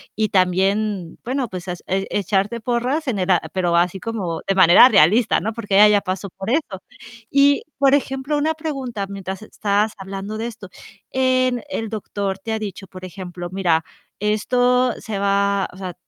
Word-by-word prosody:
y 215 0 0
también, 190 -1 0
bueno, 255 -1 -2
pues 185 0 -7
has 180 -1 -6
e 195 +1 -1
echarte 205 +3 0
porras 250 +6 -1
en 225 -6 -1
el 185 0 -2
a 180 -2 +5
pero 175 -2 +1
así 175 +2 +1
como 185 -6 -4
de 195 - +1
manera 185 +6 +8
realista, 210 +3 +4
¿no? 220 - -3
Porque 205 -3 -3
ella 210 +2 +8
ya 210 -1 +4
pasó 195 +1 -4
por 190 +3 -7
eso. 235 - -1 0.5
Y 280 0 +4 0.2
por 275 0 +4
ejemplo, 270 +1 0
una 315 +2 0
pregunta 270 -10 -4
mientras 195 0 -6
estás 210 0 0
hablando 195 +2 -6
de 230 - -2
esto. 220 -4 -10 0.4
En 255 -1 +1
el 225 -6 -3
doctor 200 -2 -4
te 220 +3 -4
ha - - 0
dicho, 200 -2 -7
por 185 0 -10
ejemplo: 180 -1 -7
"Mira, 175 -4 +1 0.4
esto 245 +4 +2
se 210 -3 -5
va", 200 0 +1
o - - -14
sea, 185 -2 -6
205 Hz, 180 wpm, -21 LUFS, 190-240 Hz, 0.5 s, manera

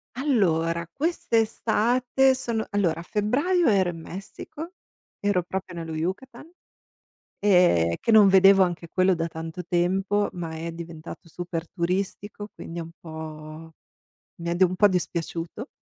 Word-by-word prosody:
Allora 170 - +1
quest'estate 250 -2 +1
sono 230 -4 -3
allora 185 -6 0
a 170 - -7
febbraio 285 - +1
ero 190 -4 +3
in 165 - -6
Messico, 200 - -8 0.5
ero 205 -3 +1
proprio 185 +1 -5
nello 165 -2 -5
Yukatan, 190 - -5 0.9
ehm, 175 - +4
che - - +1
non 215 -2 +8
vedevo 195 0 +7
anche 175 -2 -3
quello 185 +1 +3
da 165 0 -2
tanto 165 +2 -7
tempo, 190 +4 +1
ma 165 -2 -5
è 165 +1 -4
diventato 165 0 -9
super 175 0 -5
turistico, 195 +3 -3
quindi 170 +1 -7
un 165 0 -8
po' 160 0 -9 0.7
mi 170 0 -4
è 170 - 0
dov 185 +1 +4
un 185 - -4
po' 205 - +6
dispiaciuto. 175 - -2
180 Hz, 135 wpm, -25 LUFS, 165-210 Hz, 0.9 s, non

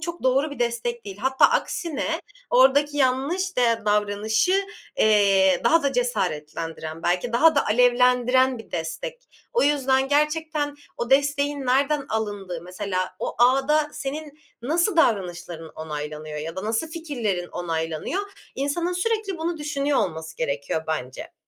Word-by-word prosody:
çok 340 -1 -5
doğru 270 +4 +2
bir 285 - -8
destek 235 0 -2
değil. 200 -1 -8
Hatta 265 +4 +2
aksine 325 -1 0 0.3
oradaki 285 +3 +4
yanlış 285 +9 0
de 230 -2 +2
davranışı, 210 - +1 0.4
eee, 195 -3 +4
daha 330 0 +4
da 280 -1 +1
cesaretlendiren 165 - -3
belki 180 +7 0
daha 315 +7 +5
da 285 - +2
alevlendiren 250 +2 +3
bir 225 - -12
destek. - - -5 0.2
O 475 - +2
yüzden 270 -2 +2
gerçekten 300 0 0 0.2
o 235 +2 -4
desteğin 285 0 +2
nereden 275 +3 +2
alındığı, 205 -6 -3
mesela 185 0 -3
o - - -3
ağda 270 +5 +3
senin 295 +2 -6 0.2
nasıl 340 - +1
davranışların 175 - 0
onaylanıyor 150 0 -6
ya 160 +2 -6
da 190 - -4
nasıl 225 +9 -1
fikirlerin 240 - -3
onaylanıyor? 165 - -3 0.3
İnsanın 335 +6 -1
sürekli 395 0 -1
bunu 330 0 -2
düşünüyor 290 -1 0
olması 160 -2 -3
gerekiyor 145 +1 -2
bence. 130 -5 -4
250 Hz, 130 wpm, -24 LUFS, 185-295 Hz, 0.4 s, daha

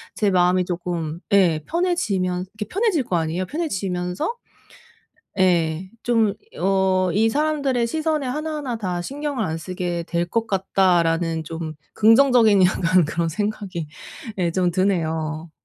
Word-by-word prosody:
제 210 - +1
마음이 180 0 +3
조금 170 -3 -3
예 175 -6 +4
편해지면 200 - 0
이게 215 -1 -5
편해질 390 - +1
거 185 - -1
아니에요. 165 +3 -1
편해지면서 190 - -2 1.1
예 175 -1 +1
좀 225 -4 +2 0.3
어 190 -1 +2
'이 220 +3 +3
사람들의 280 -2 0
시선에 310 +1 -1
하나하나 300 -2 -3
다 180 -4 -3
신경을 280 +1 -3
안 160 -3 -3
쓰게 175 0 -4
될 170 0 0
것 230 0 0
같다.'라는 175 -4 +1
좀 160 0 -6 0.2
긍정적인 225 -3 +5
약간 180 -1 +3
그런 165 +2 -1
생각이 195 -2 -3 0.5
예 175 -2 +1
좀 180 0 +1
드네요. 160 -4 -1
185 Hz, 270 characters per minute, -22 LUFS, 170-230 Hz, 1.1 s, 긍정적인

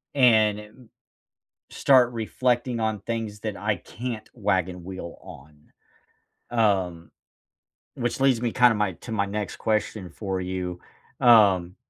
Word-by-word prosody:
and 110 -6 +4
e - - -9
mm 110 +3 -18 0.8
start 125 -3 +4
reflecting 120 +2 -1
on 110 -2 -1
things 110 -1 -4
that 105 -1 -4
I 105 +1 0
can't 115 +1 -7
wagon 95 -3 -1
wheel 95 -2 -8
on, 75 +2 -14 0.9
um, 95 -8 0 0.9
which 120 +1 -3
leads 130 -4 +3
me 120 -2 -1
kinda 125 -2 +5
my 105 -3 -1
to 90 +8 -11
my 100 -3 0
next 105 0 -4
question 105 -3 -2
for 95 +2 -4
you, 90 -1 -4 0.4
um 100 -7 +5
105 Hz, 130 wpm, -25 LUFS, 95-115 Hz, 0.9 s, kinda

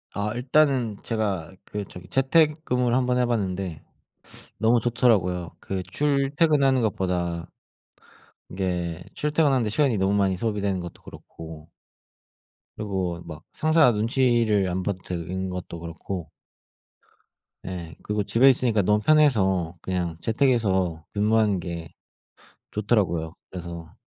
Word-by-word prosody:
아 105 +1 -1
일단은 125 -3 +2
제가 100 -8 -2
그 105 0 -4
저기 90 0 -11
재택근무를 135 - +2
1 130 0 +2
번 125 0 +1
해봤는데 95 -9 -1 0.8
너무 115 +2 +3
좋더라고요. 105 - +1
그 95 -1 -4
출퇴근하는 140 - +2
것보다 90 -5 -1 1.0
이게 90 -3 -3
출퇴근하는 150 -4 +2
데 110 - -1
시간이 125 +1 +2
너무 95 +1 +1
많이 95 -2 +2
소비되는 100 -3 -1
것도 85 -1 -8
그렇고 80 0 -11 1.0
그리고 95 -5 -3
막 75 -2 -9
상사 155 -4 +4
눈치를 115 -2 +2
안 90 +1 -2
봐도 95 -1 -2
되는 90 +2 -4
것도 90 -2 -6
그렇고. 85 +1 -6 1.3
네 85 -3 -6
그리고 105 0 -1
집에 125 +7 +5
있으니까 120 -5 +2
너무 105 +3 +3
편해서 100 - +3
그냥 90 -3 -2
재택 130 +5 +2
해서 95 -9 +1
근무하는 105 -2 +2
게 85 -2 -6 0.8
좋더라고요, 95 -7 0 0.2
그래서 85 -3 -8
100 Hz, 280 characters per minute, -25 LUFS, 90-125 Hz, 1.3 s, 집에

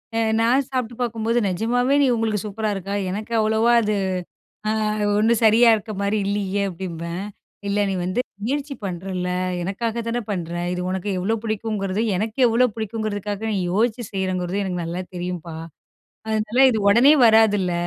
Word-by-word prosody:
அ - - +1 0.2
நான் 250 +4 +3
சாப்பிட்டு 250 -3 -3
பாக்கும்போது, 230 0 0
"நெஜமாவே 245 +8 +1
நீ 280 - +4
உங்களுக்கு 220 -2 0
சூப்பரா 215 +1 -2
இருக்கா? 195 +1 -4 0.2
எனக்கு 215 +4 -5
அவ்வளவா 220 +2 +3
அது, 215 -1 0 0.8
அ - - +2 0.5
ஒண்ணும் 225 +1 +3
சரியா 230 +2 +6
இருக்க 215 +1 -7
மாரி 200 +2 +1
இல்லியே" 200 0 -1
அப்டிம்பேன். 170 0 -5 0.4
"இல்ல. 200 +1 0
நீ - - -1
வந்து 185 +7 -1 0.2
முயற்சி 280 +3 -2
பண்றல்ல! 180 0 -3 0.3
எனக்காக 225 +5 -2
தானே 240 +1 -1
பண்ணுற? 175 -4 -3 0.2
இது 180 - -3
உனக்கு 190 +2 -3
எவ்வளோ 205 +5 0
பிடிக்குங்கிறது 215 -2 -2
எனக்கு 215 +5 -3
எவ்ளோ 235 +2 +4
பிடிக்குங்கிறதுக்காக, 210 -2 -3
நீ - - 0 0.2
யோசிச்சு 230 +4 +1
செய்றேங்கிறது, 185 0 -1
எனக்கு 180 -2 -3
நல்லா 170 +2 -4
தெரியும்ப்பா. 175 -2 -5 0.7
அதனால 220 +2 -1
இது 225 - 0
உடனே 245 +8 +7
வராதுல்ல! 210 -5 +4
215 Hz, 150 wpm, -22 LUFS, 190-230 Hz, 0.8 s, உடனே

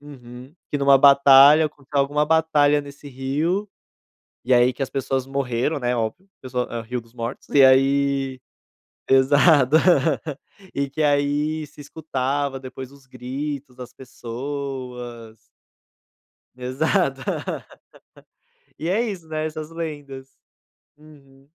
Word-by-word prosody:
uhum. 130 -1 -13 0.2
Que - - -1
em 140 - -4
uma 140 0 +6
batalha, 140 +2 +7 0.2
alguma 145 +1 +1
batalha 150 -2 +3
nesse 145 0 -12
rio, 150 +10 -2 0.8
e 125 +1 +3
aí 120 +1 +4
que 130 - -6
as 135 - -3
pessoas 135 -1 -2
morreram, 135 +1 -2
né, 125 0 -1
óbvio, 115 - -4
pessoa 125 -1 -3
ah, 120 -1 -4
Rio 125 +2 -4
dos 115 0 -22
Mortos, 115 +1 -6
e 140 -2 +6
aí 135 0 +2 0.7
pesado. 140 +2 +4 1.0
E 140 0 -1
que 155 +3 -4
aí 145 +2 0
se 145 - -14
escutava, 140 -2 -3
depois, 130 0 -9
os 140 -1 -19
gritos 130 +2 -6
das 125 -1 -10
pessoas. 125 -2 -7 1.2
Exato. 135 +3 -1 1.6
E 160 - -4
é 200 +6 +1
isso, 195 -8 -6
né, 155 0 -3
essas 155 0 -7
lendas. 145 -5 -7 0.7
Uhum. 140 -3 -19
140 Hz, 120 wpm, -22 LUFS, 130-150 Hz, 1.6 s, batalha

